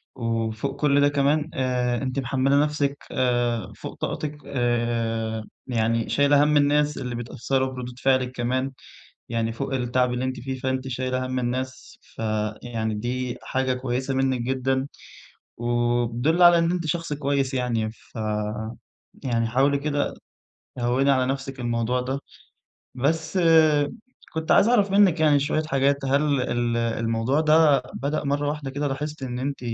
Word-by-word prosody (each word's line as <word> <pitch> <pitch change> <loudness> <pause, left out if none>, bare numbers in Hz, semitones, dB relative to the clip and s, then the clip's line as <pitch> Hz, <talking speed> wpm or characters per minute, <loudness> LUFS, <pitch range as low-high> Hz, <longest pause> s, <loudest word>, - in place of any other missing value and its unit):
وفوق 115 +2 -2
كل 145 -1 +4
ده 145 - +5
كمان 145 +2 +1
آآ 125 -2 0
أنتِ 130 0 -2
محملة 135 +2 +2
نفسِك 145 -2 -1
آآ 120 -4 0
فوق - - -8
طاقتِك 150 -1 -3
آآ 115 -3 -1 0.2
يعني 115 -1 0
شايلة 145 0 +4
هَم 150 0 +3
الناس 145 +1 +2
اللي 125 -1 -4
بيتأثروا 130 +3 -1
بردود 125 0 -7
فعلِك 130 -1 +2
كمان. 130 +2 -1 0.6
يعني 115 -1 -1
فوق 135 +3 -3
التعب 125 0 +1
اللي 125 +1 -2
أنتِ 130 -2 -3
فيه 130 +1 -4
فأنتِ 130 0 -2
شايلة 130 0 -2
هَم 130 0 -2
الناس 130 +1 -4
ف - - -24 0.4
يعني 110 -2 -2
دي 125 +3 -3
حاجة 130 -1 0
كويسة 130 +1 -2
منك 130 -2 +1
جدًا، 130 +1 0 0.7
وبتدل 120 +6 +1
على 175 -1 +8
إن 165 +1 +2
أنتِ 175 -2 -2
شخص 165 0 -2
كويس 140 -2 0
يعني 115 -4 -1
ف 115 - -23 1.1
يعني 115 -3 0
حاولي 135 +4 +2
كده 145 0 -1 0.7
هوّني 125 +3 +2
على 130 -2 +3
نفسِك 135 0 -4
الموضوع 120 +1 0
ده، 130 +2 -2 0.8
بس 155 +6 0 0.9
كنت 160 -1 -2
عايز 205 - +6
أعرف 205 -5 +3
منِّك 195 -5 +5
يعني 150 -2 +4
شوية 155 +2 0
حاجات. 140 -1 +1
هل 140 0 +2
ال 120 -1 0
الموضوع 115 +3 0
ده 155 -4 +5
بدأ 145 +3 -2
مرة 145 +1 0
واحدة 145 -3 -4
كده 145 +1 -2
لاحظتِ 145 +1 -4
إن 125 -1 -4
أنتِ 140 +2 -3
130 Hz, 145 wpm, -24 LUFS, 120-145 Hz, 1.1 s, على